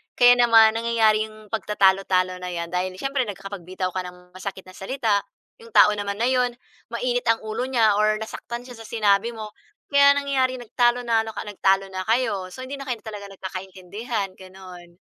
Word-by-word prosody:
Kaya 245 0 +7
naman 225 -2 +6
nangyayari 225 -2 +2
'yong 215 0 -14
pagtatalo-talo 190 -4 +2
na 180 0 -6
'yan 170 -1 -4
dahil 185 +1 -1
siyempre 275 -1 0
nagkakapagbitaw 190 -2 -5
ka 185 - 0
ng 180 0 -13
masakit 190 0 -6
na 185 - -13
salita, 210 -1 -1 0.4
'yong 460 - -14
tao 210 - +7
naman 200 0 -4
na 235 - +2
'yon 250 -1 +2 0.4
mainit 245 +1 -1
ang 230 0 +3
ulo 220 +3 -3
niya 225 -5 +3
or 215 0 +2
nasaktan 235 +2 -7
siya 245 - -10
sa 225 - -11
sinabi 215 0 +2
mo. 215 -2 -7 0.4
Kaya 280 0 +6
nangyayari 265 -2 0
nagtalo 240 0 +1
nalo 225 -1 +1
ka, - - -5
nagtalo 195 -1 +1
na 185 - -3
kayo 205 -6 0
so 255 - -11
hindi 270 - -8
na 275 -1 -8
kayo 245 - -1
talaga 205 -2 -7
nagkakaintindihan, 190 +2 -5
gano'n. 185 -2 -13
215 Hz, 180 wpm, -23 LUFS, 190-240 Hz, 0.4 s, Kaya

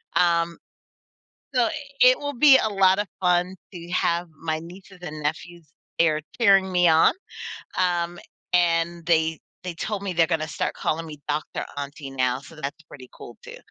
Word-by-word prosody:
um, 170 -1 +2 1.0
so 245 -2 +3 0.3
it 250 +1 +7
will 285 -1 -4
be 270 +1 +7
a - - +1
lotta 195 0 +3
fun 180 0 +2 0.2
to 170 0 -9
have 170 -1 0
my 160 +1 -3
nieces 180 +3 -13
and 155 -3 -7
nephews 165 +2 -4 0.3
there 155 -2 +3 0.2
cheering 195 -4 +5
me 180 -1 +4
on, 160 0 +5 0.7
um, 175 -1 0 0.3
and 170 -1 +2
they 160 -2 +2 0.2
they 180 -2 -4
told 200 +4 -4
me 195 - -2
they're 165 -1 +3
gonna 160 -2 -1
start 150 - -2
calling 165 +1 -2
me 150 -2 -9
Doctor 150 +1 -2
Auntie 140 0 -6
now, 130 -1 0
so 140 +4 -14
that's 145 +3 -5
pretty 130 -4 -13
cool 120 - -12
too. - - -10
170 Hz, 160 wpm, -24 LUFS, 155-185 Hz, 1.0 s, it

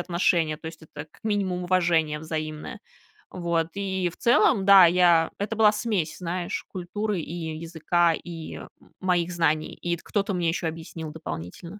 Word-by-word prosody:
отношения, 170 -3 +1
то 160 - -11
есть 160 0 -8
это 150 -1 -9
как - - -24
минимум 195 -4 -1
уважение 170 -4 +2
взаимное. 155 -1 -5 0.5
Вот, 170 -2 -1
и 190 -2 -1
в 170 - -11
целом 215 -4 +3
да, 195 -2 +9
я 170 -1 +4
это 210 +2 -2
была 215 -1 +6
смесь, 210 -7 -2
знаешь, 175 0 -4
культуры 195 +2 -3
и 160 0 -5
языка, 165 +1 +1
и 165 -1 -7
м - - -9 0.3
моих 180 -2 +1
знаний, 155 -3 0
ит 170 -1 -2
кто-то 200 -1 -1
мне 175 -2 0
ещё 170 0 -1
объяснил 160 -1 -6
дополнительно. 90 - -7
170 Hz, 160 wpm, -25 LUFS, 160-185 Hz, 0.5 s, да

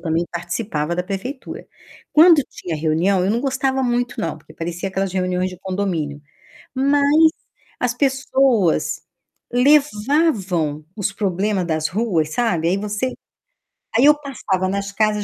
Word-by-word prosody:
também 165 0 0
participava 170 -2 -3
da 180 - 0
prefeitura. 205 +9 -6 0.5
Quando 320 0 +8
tinha 170 -3 -6
reunião, 165 +5 +1
eu 190 - +1
não 230 +3 0
gostava 265 -1 0
muito 245 0 -1
não, 160 -1 -3
porque 155 +1 -18
parecia 175 +3 -4
aquelas 190 -1 -2
reuniões 185 0 -1
de 180 - -11
condomínio. 180 -7 -3 0.5
Mas 285 +4 +4 0.5
as 245 -1 0
pessoas 260 - +1 0.5
levavam 245 - +2
os 200 -1 -1
problema 195 -1 -1
das 155 -2 -1
ruas, 175 -7 -1
sabe, 180 -9 0
aí 180 - +2
você 210 +5 -2 0.8
aí 240 - +4
eu 300 +1 +8
passava 210 -10 -2
nas 200 +1 -2
casas: 210 0 +1
200 Hz, 135 wpm, -20 LUFS, 175-255 Hz, 0.8 s, Quando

